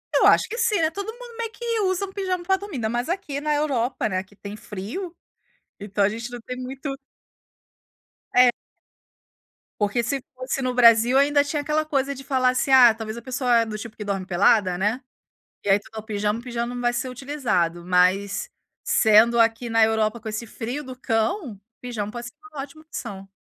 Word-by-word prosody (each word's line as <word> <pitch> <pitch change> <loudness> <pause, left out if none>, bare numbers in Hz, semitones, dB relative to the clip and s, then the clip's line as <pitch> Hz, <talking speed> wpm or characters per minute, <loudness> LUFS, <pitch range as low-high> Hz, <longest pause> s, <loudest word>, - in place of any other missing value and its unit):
Eu - - +5
acho - - +5
que 465 - -5
sim, 460 -3 +2
eh, 315 -1 +3
todo 400 +4 -5
mundo 480 -1 -12
meio 455 -1 -3
que 465 -1 -2
usa 375 0 0
um 385 - -11
pijama 370 -3 -2
para 385 +1 +2
dormir, 400 -5 -8
ainda 220 -3 -1
mais 240 +6 -2
aqui 345 -7 -3
na 300 0 0
Europa, 260 -6 0
né, 185 0 -1
que 200 +1 -23
tem 205 +1 -8
frio, 240 - -6 0.6
então 200 0 -1
a - - +4
gente 230 +3 -5
não 245 -1 -7
tem 250 +2 -7
muito 270 +2 -5 1.4
É. 250 0 +7 1.3
Porque 210 +4 +1
se 270 +2 -2
fosse 255 +1 -3
no 255 -1 -1
Brasil, 235 +1 +6
ainda 285 +1 +4
tinha 290 +1 -2
aquela 305 +1 0
coisa 280 -2 0
de 270 - -9
falar 260 -2 +2
assim: 255 +2 0
"Ah, 250 -4 +8
talvez 220 0 -6
a - - -7
pessoa 250 -2 +1
é 230 - +2
do 215 -1 -5
tipo 215 +1 -9
que 210 - -6
dorme 195 -2 -3
pelada, 185 0 +3
né". 210 +7 0 0.6
E - - -5
aí 195 +1 +5
tu - - -17
dá 220 - -7
o - - -5
pijama, 210 0 -1
o - - -14
pijama 240 0 -3
não 245 - -4
vai 240 0 +2
ser 255 +1 -2
utilizado, 235 - -1
mas 185 - +2 0.3
sendo 220 +2 +5
aqui 230 +1 +2
na 225 -1 +4
Europa, 220 +1 +1
com 220 - -18
esse 215 +2 -4
frio 245 +6 -5
do 255 -2 -9
cão, 225 - -1 0.2
pijama 215 -4 -4
pode 240 +1 -7 0.2
ótima 280 +2 -7
opção. 195 -10 -8
245 Hz, 200 wpm, -24 LUFS, 215-285 Hz, 1.4 s, Ah